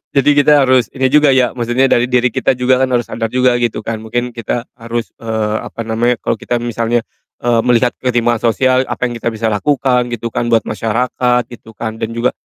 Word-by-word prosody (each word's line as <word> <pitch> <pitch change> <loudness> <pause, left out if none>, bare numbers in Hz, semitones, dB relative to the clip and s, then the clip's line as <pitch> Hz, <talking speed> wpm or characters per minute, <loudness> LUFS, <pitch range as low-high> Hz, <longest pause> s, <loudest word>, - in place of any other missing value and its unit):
Jadi 140 +1 +4
kita 145 0 +5
harus 130 -2 +3
ini 130 -1 +2
juga 150 -1 +5
ya, 125 -2 +3
maksudnya 120 +2 +1
dari 120 +1 +3
diri 125 -1 +2
kita 130 - +1
juga 125 +1 +2
kan 130 - +2
harus 120 -1 +2
sadar 115 0 -3
juga 125 0 +3
gitu 120 -2 -1
kan. 115 0 -4
Mungkin 120 +2 -2
kita 115 +1 -3
harus, 115 0 -5
eee, 110 -2 -2
apa 115 - -7
namanya, 115 +2 0
kalau 115 -2 -1
kita 120 - -2
misalnya, 120 0 -1 0.4
eee, 120 -1 +2
melihat 120 0 +3
ketimpangan 120 -2 +1
sosial, 130 +2 +2
apa - - -4
yang - - -6
kita - - -4
bisa 110 0 -2
lakukan 125 +2 +1
gitu 115 0 -4
kan 120 - -2
buat 115 -1 +3
masyarakat 120 +3 0
gitu 115 -2 -12
kan 110 0 -5
dan 115 +1 -4
juga, 120 +2 +1
120 Hz, 205 wpm, -15 LUFS, 115-125 Hz, 0.4 s, kita